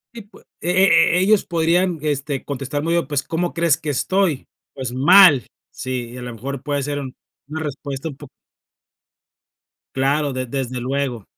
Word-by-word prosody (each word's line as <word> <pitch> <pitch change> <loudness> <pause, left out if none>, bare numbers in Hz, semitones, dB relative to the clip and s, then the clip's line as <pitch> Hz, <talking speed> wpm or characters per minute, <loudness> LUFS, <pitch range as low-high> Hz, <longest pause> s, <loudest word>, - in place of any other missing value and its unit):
Y 230 - -7
pues, 205 +2 -19 0.2
e 175 - -2 0.5
e 180 - +3
ellos 205 +2 +3
podrían, 170 +1 +1
este, 140 -2 -2
contestar 140 +1 -4
muy 165 +1 0
bien, 170 - +1
pues, 145 -2 -1
¿cómo 175 +2 -2
crees 170 -2 +2
que 150 - -5
estoy? 165 +1 0 0.3
Pues, 130 -3 -5
¡mal!, 150 - +6 0.2
sí, 125 -2 -5
a 125 - -8
la 125 0 -6
mejor 135 +4 -6
puede 145 -2 -1
ser 145 0 -3
un 130 -2 -7 0.3
una 155 +1 -5
respuesta 140 0 -5
un 140 - -9
po 145 +1 -12 1.7
Claro, 140 +1 +1
de 130 -1 -3
desde 130 -1 -3
luego. 130 -4 -2
145 Hz, 170 wpm, -20 LUFS, 130-165 Hz, 1.7 s, mal